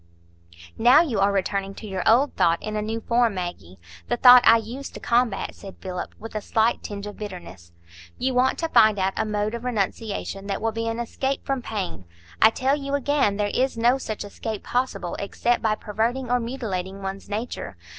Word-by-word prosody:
"Now 250 +7 +7
you 245 -11 -2
are 200 +1 +3
returning 195 0 -1
to - - -9
your 190 -3 -3
old 260 +6 +4
thought 170 0 +3
in 215 0 -4
a 210 - 0
new 220 +2 -3
form, 235 -2 +2
Maggie,—the 85 - -6
thought 250 0 +9
I 230 - +8
used 240 +5 -7
to - - -6
combat," 240 -2 0
said 195 -1 -11
Philip, 180 -1 -6
with 225 - -9
a 215 - -3
slight 225 +3 +1
tinge 200 -1 -6
of 210 - -8
bitterness. 175 - -9 0.5
"You 260 0 -1
want 250 +1 +2
to 330 - -2
find 215 -6 +5
out 190 0 0
a 220 - 0
mode 210 0 -1
of 235 0 -5
renunciation 205 -3 -3
that 195 -1 -2
will 225 0 0
be 225 +1 -3
an 225 0 -2
escape 265 +3 -2
from 270 -2 -1
pain. 95 - -5 0.4
I 220 - +9
tell 265 +4 +1
you 280 -1 -3
again, 280 -7 +1
there 205 -1 0
is 260 -1 0
no 240 +3 +3
such 215 -5 -5
escape 215 +1 -6
possible 230 -8 -2
except 235 +4 0
by 215 -1 +1
perverting 230 +5 -2
or 245 - +3
mutilating 200 -6 -4
one's 195 +1 -6
nature. 215 - -5
220 Hz, 195 wpm, -24 LUFS, 195-245 Hz, 0.5 s, thought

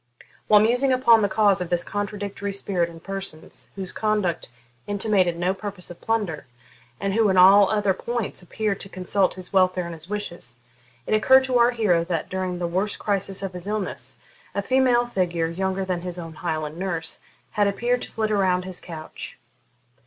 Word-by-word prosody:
While 210 -1 +7
musing 245 +5 +3
upon 235 -3 +5
the 205 - +2
cause 200 -2 +3
of 180 - -3
this 175 -1 +1
contradictory 205 0 -4
spirit 185 -3 -1
in 165 -1 -12
persons 195 -4 -7
whose 190 -2 -4
conduct 210 -6 0 0.4
intimated 200 -4 +2
no 180 +2 +1
purpose 195 -3 -7
of 175 - -12
plunder, 205 - -1 0.5
and 195 0 -1
who, 220 -1 +3
in 190 - +2
all 195 +2 +8
other 205 -2 +2
points, 235 +2 -3
appeared 200 +2 -2
to 195 - -8
consult 185 +1 0
his 185 0 -8
welfare 185 -1 +3
and 170 - -6
his 160 +2 -9
wishes, 175 - -4 0.5
it - - -1
occurred 260 +5 +6
to 255 -2 +1
our 235 0 +6
hero 210 -9 +2
that, 170 -2 -3
during 185 -1 -2
the 175 - -2
worst 185 +5 -1
crisis 195 -1 -1
of 190 -1 -4
his 180 +1 -8
illness, 210 -2 -4 0.4
a 200 - 0
female 255 0 +3
figure, 175 -7 -1
younger 190 +2 -2
than 180 -2 -2
his 180 0 -5
old 165 -3 -8
Highland 155 -1 -3
nurse, 170 -4 -3 0.3
had 205 -1 +2
appeared 240 +5 0
to - - -6
flit 220 -1 -1
around 185 -3 +2
his 185 -1 -5
couch. 160 -2 -8
195 Hz, 180 wpm, -24 LUFS, 180-210 Hz, 0.5 s, all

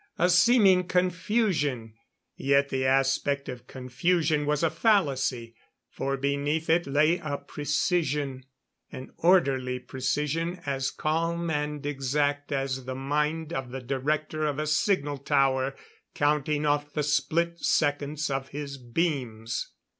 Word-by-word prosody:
A 180 +2 +3
seeming 190 -1 +5
confusion; 180 - 0 0.4
yet 140 0 +2
the 130 -1 0
aspect 135 +1 +1
of 125 -1 -8
confusion 150 +4 0
was 150 +1 +1
a 165 - +2
fallacy, 135 - +1 0.4
for 135 0 -2
beneath 140 +4 0
it 170 0 +2
lay 155 +5 +3
a 145 -3 -3
precision 145 -3 -1 0.5
an 130 - -9
orderly 135 -8 +3
precision 150 +7 -2
as 135 -1 -1
calm 165 +3 -1
and 150 -1 -2
exact 145 +1 -1
as 135 -2 -2
the 130 0 -4
mind 150 +4 -1
of 130 -4 -3
the 135 +2 -5
Director 150 +4 -2
of 145 -2 -2
a 155 - -1
Signal 145 -2 +1
Tower 135 0 +1 0.4
counting 150 0 +1
off 145 0 0
the 150 - -1
split 165 +4 0
seconds 145 0 0
of 135 0 -2
his 140 -1 -6
beams. 120 -4 -2
145 Hz, 125 wpm, -27 LUFS, 135-160 Hz, 0.5 s, seeming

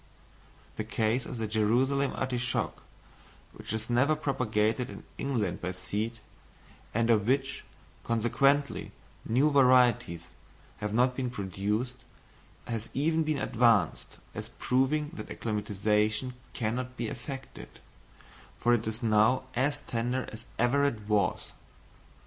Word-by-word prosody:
The - - -1
case 115 +3 0
of 125 - -6
the 110 - -2
Jerusalem 120 +6 +2
artichoke, 125 -1 -1 0.7
which - - -8
is 110 0 -2
never 125 +6 +3
propagated 125 -5 0
in - - -9 0.2
England 115 -10 -1
by 90 +1 -2
seed, 110 +5 -3 0.7
and 115 +1 +2
of 105 -2 +3
which, 135 +1 0 0.4
consequently, 135 +5 +1 0.3
new 135 +7 +3
varieties 125 - +4 0.5
have 105 0 -3
not 125 +3 +3
been 130 -1 -1
produced, 105 +3 -2 0.7
has 115 -1 -4
even 160 +4 +2
been 155 -2 0
advanced, 120 -3 +2 0.2
as - - -6
proving 145 +4 +1
that - - -7
acclimatisation 105 +2 0 0.2
cannot 125 +3 -2
be 120 - -2
effected, 135 +4 -8 0.8
for 120 - +3
it 115 -2 +1
is 110 +3 -3
now 110 +4 +4
as 145 +3 +1
tender 125 0 -2
as 110 +1 -9
ever 120 +4 +3
it 140 -7 0
was! 105 -2 +1
120 Hz, 120 wpm, -29 LUFS, 110-130 Hz, 0.8 s, varieties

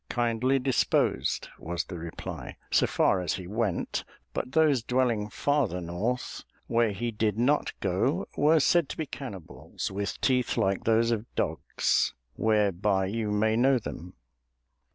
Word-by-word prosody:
"Kindly 120 +2 +1
disposed," 130 -1 +1
was 85 +1 -3
the 90 -3 -8
reply, 80 0 -7
"so - - +4
far 95 - +2
as 90 - -1
he 90 - -5
went, 105 0 -1 0.3
but 130 - -3
those 155 -6 +4
dwelling 120 -3 0
farther 135 - 0
north, 90 +9 -3 0.2
where 115 -2 +2
he 120 +4 -3
did 105 -1 0
not 140 +6 +2
go, - - 0
were 155 +2 +4
said 170 0 +3
to - - -6
be 160 - -2
cannibals 125 - -7
with 100 +1 -3
teeth 125 -2 +1
like 95 0 +1
those 115 +1 +3
of 115 0 -1
dogs, - - 0 0.2
whereby 100 -3 +2
you 110 +2 -2
may 110 +1 +2
know 130 +3 +4
them." 90 -6 -7
115 Hz, 145 wpm, -28 LUFS, 100-125 Hz, 0.3 s, so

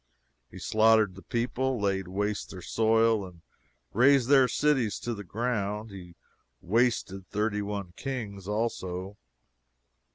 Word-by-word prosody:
He - - -12
slaughtered 110 -2 +3
the 95 - -12
people, 120 +5 -1
laid 95 -2 0
waste 105 +3 -2
their 90 -2 -9
soil, 115 0 +2
and 90 -3 -11 0.5
razed 130 +2 +4
their 135 -2 +6
cities 130 -4 +1
to 120 - -3
the 105 -2 -7
ground. 105 0 -2
He 90 -3 -11 0.4
wasted 100 -3 0
thirty 105 0 -1
one 100 -3 -5
kings 105 -8 -5
also. 100 -3 -3
105 Hz, 125 wpm, -28 LUFS, 95-120 Hz, 0.5 s, their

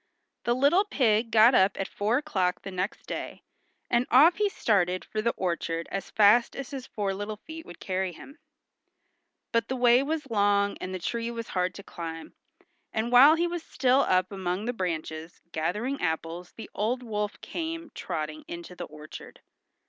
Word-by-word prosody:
The 240 - +2
little 285 +9 +4
pig 230 - +2
got 225 +3 +6
up 190 -3 +3
at 195 - -1
four 215 +4 0
o'clock 190 -12 -1
the 195 - -6
next 185 +2 -3
day, - - -6 0.4
and 240 +1 +1
off 310 +8 +6
he 415 0 +2
started 185 - +1
for 215 - -3
the 235 - +1
orchard 170 -2 -2
as 195 - -4
fast 215 +3 +4
as 275 0 -6
his 270 -2 -6
four 200 -2 -2
little 205 +2 -5
feet 320 +7 -10
would 175 - -11
carry 185 -1 -2
him. 275 - -13 1.1
But 230 0 +1
the 260 - -2
way 245 0 +5
was 295 -2 -3
long, 200 -1 +2
and 185 - -4
the 185 - -3
tree 230 +6 -3
was 230 -1 -6
hard 180 -1 -1
to 200 - -9
climb, 165 -3 -7 0.6
and 220 +2 -1
while 275 +6 +8
he 340 +1 +1
was 345 -1 -3
still 260 -3 +2
up 185 -3 +2
among 190 +1 -3
the 245 - -1
branches 165 -4 -4
gathering 210 - -2
apples 165 +1 -3
the 225 - -10
old 240 +5 -1
wolf 210 -3 -3
came 330 -1 -5
trotting 155 -3 -4
into 170 +1 -8
the 175 - -6
orchard. 155 0 -11
210 Hz, 180 wpm, -27 LUFS, 180-250 Hz, 1.1 s, while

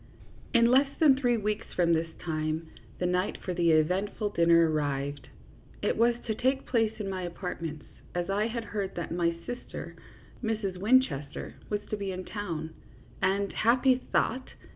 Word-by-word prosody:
In 235 -1 +5
less 270 +2 +5
than 295 -4 +7
three 245 -3 +2
weeks 210 -1 -2
from 170 -2 +3
this 165 0 +1
time 155 0 -2 0.3
the 180 - -1
night 180 +2 0
for 185 - -4
the 170 -1 +2
eventful 190 +7 +1
dinner 170 -2 +5
arrived. 145 -2 -2 0.6
It - - +2
was 235 +1 +4
to 220 - 0
take 260 +4 0
place 225 -3 +2
in 205 - -3
my 190 -1 -3
apartments, 170 -3 -5 0.3
as 175 0 -1
I 205 +3 +1
had 230 0 -3
heard 205 -3 -4
that 175 - -4
my 170 0 +1
sis 245 0 -4
ter, - - -7 0.5
Mrs. 215 -4 -1
Winchester, 200 - +1 0.2
was 210 -1 -1
to 215 - 0
be 200 -1 -3
in 185 0 -5
town, 165 -7 -4 0.5
and 195 +1 +1
happy 250 +4 +4 0.2
thought 255 +3 +1
195 Hz, 165 wpm, -29 LUFS, 170-225 Hz, 0.6 s, than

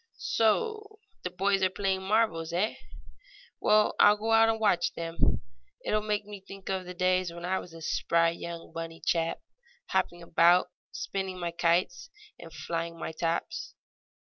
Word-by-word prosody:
"So 425 - 0 0.3
the 180 - -2
boys 195 +2 +1
are 185 - +4
playing 190 0 -1
marbles, 190 -5 +1
eh? 190 +6 +1 0.9
Well, 215 0 +4
I'll 210 0 +7
go 220 +2 -2
out 225 0 +6
and 225 0 0
watch 200 -5 +2
them. 165 0 0 0.4
It - - -1
will 215 - +3
make 210 -1 -1
me 205 -1 -8
think 195 0 -10
of 190 -1 -2
the 180 0 -8
days 185 0 +1
when 170 +1 -7
I 190 +1 0
was 175 - -10
a 165 - -10
spry 165 +1 +2
young 170 0 -7
bunny 165 0 -6
chap, 165 -1 0 0.5
hopping 175 0 0
about, 170 +2 +4 0.2
spinning 190 -1 -4
my 170 -1 -2
kites 175 - +1 0.3
and 165 -1 -11
flying 165 +1 -4
my 165 - -4
tops." 165 - -3
185 Hz, 165 wpm, -29 LUFS, 170-210 Hz, 0.9 s, I'll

